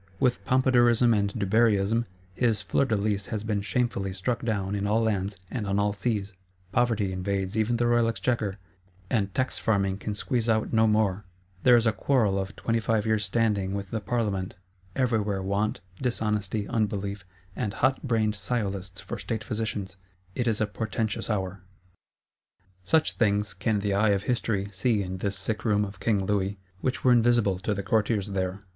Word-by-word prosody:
With 125 -2 +1
Pompadourism 125 -2 +4
and 100 -2 +1
Dubarryism, 110 +2 +2 0.3
his 115 0 +1
Fleur 140 - +1
de 115 -4 +1
lis 100 -1 -1
has 110 -2 -3
been 105 -2 -1
shamefully 100 -2 -1
struck 105 +6 -2
down 100 -4 -1
in 100 0 -1
all 110 +2 +2
lands 100 -2 -1
and 105 -5 -3
on 100 0 0
all 100 0 +2
seas; 105 -1 -2 0.4
Poverty 105 -4 +1
invades 95 +1 -2
even 110 +2 +1
the 120 - +1
Royal 120 -1 +3
Exchequer, 115 -3 -1 0.5
and 100 -4 +1
Tax 130 0 0
farming 100 -3 +1
can 105 +1 -4
squeeze 120 +1 0
out 110 0 +1
no 110 0 +4
more; 105 -2 +2 0.4
there 125 -1 +7
is 115 - +2
a 110 - +4
quarrel 110 -6 +1
of 95 +1 -4
twenty 115 0 0
five 110 -1 0
years' 110 -1 +1
standing 100 -2 0
with 100 -1 -5
the 110 - -1
Parlement; 100 -5 -1 0.4
everywhere 110 -6 0
Want, 100 +2 -1 0.2
Dishonesty, 105 -4 -1
Unbelief, 100 -4 -2 0.3
and 105 - -2
hotbrained 115 -5 +1
Sciolists 95 -3 -3
for 120 - -6
state 110 +2 -3
physicians: 105 -3 -3 0.4
it 120 +3 -1
is 110 -2 +1
a 110 - +2
portentous 110 +1 -2
hour. 95 -3 -2 1.2
Such 160 - +2
things 105 -2 +1
can 110 -3 0
the 100 -1 0
eye 105 +2 +3
of 100 -1 +1
History 110 -5 0
see 105 +2 +1
in 95 0 -5
this 100 0 -2
sick 105 +2 -2
room 105 -2 +2
of 100 -1 -9
King 100 -4 +1
Louis, 100 0 0 0.2
which 130 +4 -2
were 130 - +5
invisible 120 -5 +3
to 105 +3 -1
the 100 - -3
Courtiers 105 -1 +1
there. 95 0 -2
105 Hz, 175 wpm, -27 LUFS, 100-115 Hz, 1.2 s, there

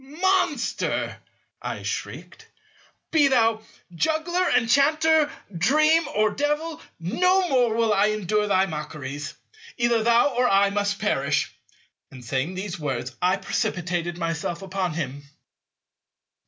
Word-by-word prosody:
"Monster," 315 -3 0 0.5
I - - -5
shrieked, - - -6 0.6
"be 305 -3 +5
thou 225 -4 +2 0.3
juggler, 320 - 0
enchanter, 300 +5 +3 0.3
dream, 305 - +3
or 215 0 +3
devil, 295 +5 -2 0.2
no 365 - +2
more 245 -6 +2
will 225 -2 +2
I 200 +1 +3
endure 210 0 0
thy 190 -1 +3
mockeries. 150 -3 -6 0.4
Either 235 -1 +2
thou 235 +4 +4
or 250 +1 +2
I 200 0 +4
must 205 0 -1
perish." 145 -9 0 0.6
And 125 -2 -12
saying 135 +9 -2
these 190 -2 -5
words 130 -4 -4
I 185 +2 +2
precipitated 175 -2 -2
myself 165 +1 -3
upon 190 -3 -2
him. 140 -4 -4
210 Hz, 115 wpm, -24 LUFS, 175-285 Hz, 0.6 s, be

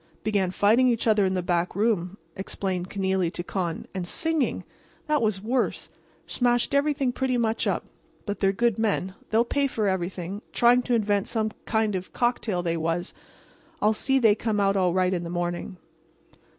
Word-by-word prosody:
"Began 200 -3 +1
fighting 220 +7 +4
each 235 -2 +1
other 215 -3 +4
in 190 0 0
the 180 - -1
back 175 0 0
room," 200 -3 0 0.2
explained 190 -2 -3
Kenealy 190 -3 0
to 175 - -4
Con. 175 -3 -3
"And 185 -2 -4
singing! 320 - 0 0.4
That 300 -3 +1
was 210 -3 0
worse. 245 +4 -1 0.4
Smashed 245 +2 +1
everything 280 -2 +2
pretty 255 0 0
much 225 -1 0
up. - - -1 0.4
But 205 -2 -3
they're 195 -1 +3
good 230 +1 +1
men. 200 -4 0 0.2
They'll 225 +2 +3
pay 280 +3 +1
for 220 -5 -1
everything. 190 +1 -3
Trying 245 +1 +5
to 245 - +4
invent 205 -3 +1
some 220 -2 0
new - - -20
kind 220 -1 +1
of 185 -1 -5
cocktail, 235 -7 0
they 170 -1 -1
was. 165 +3 -2 0.7
I'll 215 +1 +3
see 270 +5 +1
they 225 -5 +5
come 215 0 -1
out 195 0 +2
all 185 -2 +2
right 185 +1 +2
in 175 -1 -2
the 170 - -5
morning." 175 +1 -3
205 Hz, 180 wpm, -26 LUFS, 185-235 Hz, 0.7 s, Trying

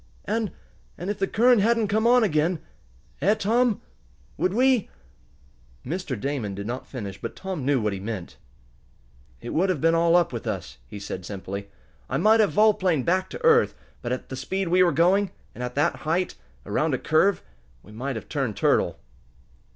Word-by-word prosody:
"And 220 0 -1 0.5
and 180 +4 -3
if 205 - -6
the 195 - +1
current 240 +1 +4
hadn't 225 0 +2
come 220 +2 +2
on 245 0 +5
again; 165 -2 +1 0.6
eh, 200 +8 +4
Tom? 230 +2 +1 0.5
Would 185 - 0
we 250 +1 +3 0.5
?" 60 -1 -31
Mr. 150 - -3
Damon 125 -6 -3
did 100 +1 -6
not 120 +4 -5
finish, 100 -7 -7
but - - -5
Tom 190 -7 -5
knew 140 -2 +3
what 105 -2 -1
he 95 - -5
meant. 95 - -6 1.0
"It - - -6
would 190 +4 +2
have 180 -6 0
been 165 +3 +3
all 165 0 +4
up 175 -6 +3
with 115 - -5
us," - - -5
he 100 - -8
said 95 -2 -6
simply. 100 +1 -6 0.4
"I - - 0
might 220 +1 +5
have 210 -3 +4
volplaned 190 - +3
back 185 +2 +1
to 480 - -6
earth, 470 0 +5 0.3
but 120 - -4
at 125 - -4
the 130 - -5
speed 185 +8 -2
we 180 +2 +4
were 180 -1 +5
going, 180 +6 +3 0.2
and 125 - -6
at 125 0 -5
the 145 - +4
height, 170 +4 -1 0.3
around 150 -3 0
a - - -2
curve, 170 +9 +2 0.4
we 105 - -15
might 130 +5 -4
have 110 - -7
turned 135 -9 -2
turtle." - - +2
165 Hz, 190 wpm, -25 LUFS, 120-200 Hz, 1.0 s, on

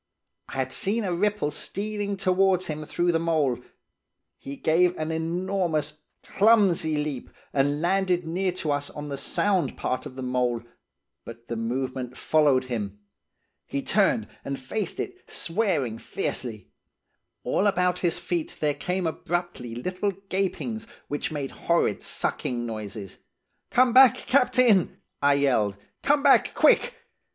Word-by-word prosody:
I - - -9
had 130 -1 -2
seen 215 +4 0
a 185 -3 -1
ripple 205 -3 0
stealing 205 +4 -4
towards 185 0 +2
him 155 0 -4
through 175 +3 +1
the 165 - +1
mould. 150 -7 0 0.8
He 140 - -7
gave 175 +5 +2
an 155 +1 -2
enormous, 165 -2 -1 0.2
clumsy 195 -8 +3
leap, 150 -3 -3 0.2
and 145 +1 +1
landed 180 -1 +1
near 180 +3 0
to 160 -4 -2
us 145 0 -1
on 150 0 -7
the 140 - -3
sound 190 +5 +1
part 130 +3 -2
of 130 - -12
the 130 - -6
mould, 125 -2 0 0.6
but 115 0 -11
the 115 - -2
movement 125 +2 -3
followed 145 -4 +3
him. 105 -5 -4 0.7
He 140 - -3
turned 210 +3 +2 0.2
and 140 0 -3
faced 185 +9 -3
it, 370 -1 -6
swearing 165 - -1
fiercely. 110 -4 -3 0.7
All 205 - +1
about 180 -2 +1
his 175 -1 0
feet 175 -2 -3
there 150 -1 +1
came 180 +4 -2
abruptly 165 -7 -3
little 185 - -2 0.2
gapings, 220 +4 -2 0.2
which 145 +2 -2
made 145 -3 -4
horrid 170 -11 0
sucking 120 -1 -2
noises. 105 -3 -6 0.5
'Come 250 -1 +4
back, 255 -1 +8
captain!' 250 - +3 0.2
I 145 0 +4
yelled. 115 -8 +2 0.2
'Come 285 0 +2
back, - - +5
quick! - - +4
160 Hz, 140 wpm, -26 LUFS, 135-190 Hz, 0.8 s, back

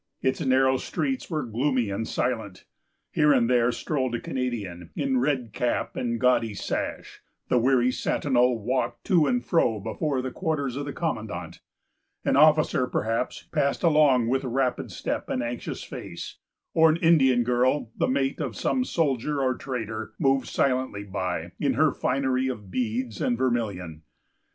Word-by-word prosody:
Its 130 +4 +1
narrow 130 0 +3
streets 265 - -3
were 155 -4 -1
gloomy 125 -1 0
and 110 +3 -3
silent. 110 -7 -2 0.5
Here 150 -1 +4
and 125 -4 +4
there 120 -1 +3
strolled 130 0 -2
a - - -2
Canadian, 105 -10 -4
in 265 -2 +1
red 130 - -1
cap 120 +3 -1
and 120 -2 -2
gaudy 120 -4 +2
sash; - - -4 0.3
the 125 - +4
weary 125 0 +3
sentinel 125 -2 +1
walked 125 +5 -2
to 170 -7 +3
and 245 0 0
fro 120 - +2
before 130 +6 -2
the 130 - -3
quarters 145 -8 -2
of 140 +1 -3
the 145 - -4
commandant; 110 -11 -4 0.7
an - - +2
officer, 150 -3 +4
perhaps, 115 0 -2
passed 140 -1 0
along 150 -7 +4
with 130 +3 +1
rapid 130 0 -1
step - - -4
and 125 - -1
anxious 120 0 -5
face; - - -8 0.4
or 160 0 +6
an 155 - +2
Indian 135 -8 +4
girl, 125 +1 +1
the - - +1
mate 135 +2 0
of 130 -8 -3
some 255 - 0
soldier 150 - 0
or 130 -1 +2
trader, 115 -4 -5
moved 135 -3 +2
silently 130 -6 0
by, 90 -4 -3
in 140 -3 +1
her 155 +3 +4
finery 130 0 0
of 105 -7 -5
beads 120 -1 -2
and 120 - +1
vermilion. 100 -11 -2
130 Hz, 155 wpm, -26 LUFS, 115-140 Hz, 0.7 s, or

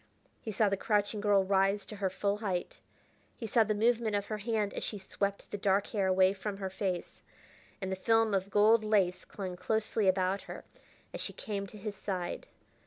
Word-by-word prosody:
He 220 - -4
saw 215 +1 +3
the 195 0 +1
crouching 205 0 0
girl 205 -2 +4
rise 195 +1 +2
to 210 - -8
her 195 -1 0
full 200 +2 -1
height; 190 -5 -3 0.6
he 230 - -5
saw 225 +1 +4
the 215 0 -1
movement 225 0 +2
of 200 0 0
her 215 - -3
hand 215 -1 -1
as - - -4
she 210 - -3
swept 200 +1 -3
the 205 - -4
dark 195 0 +2
hair 200 -4 0
away 185 0 +4
from 200 0 -5
her 190 -1 -4
face, 190 -2 -3 0.6
and 190 -1 -3
the - - 0
film 225 +2 +2
of 195 0 0
gold 215 +2 +5
lace 200 -4 +2
clung 185 -3 -6
closely 215 +2 0
about 185 +1 +2
her - - -7 0.5
as - - -4
she - - -3
came 200 -4 -4
to 210 - -11
his 205 0 -5
side. 185 -3 -4
200 Hz, 200 wpm, -31 LUFS, 190-215 Hz, 0.6 s, gold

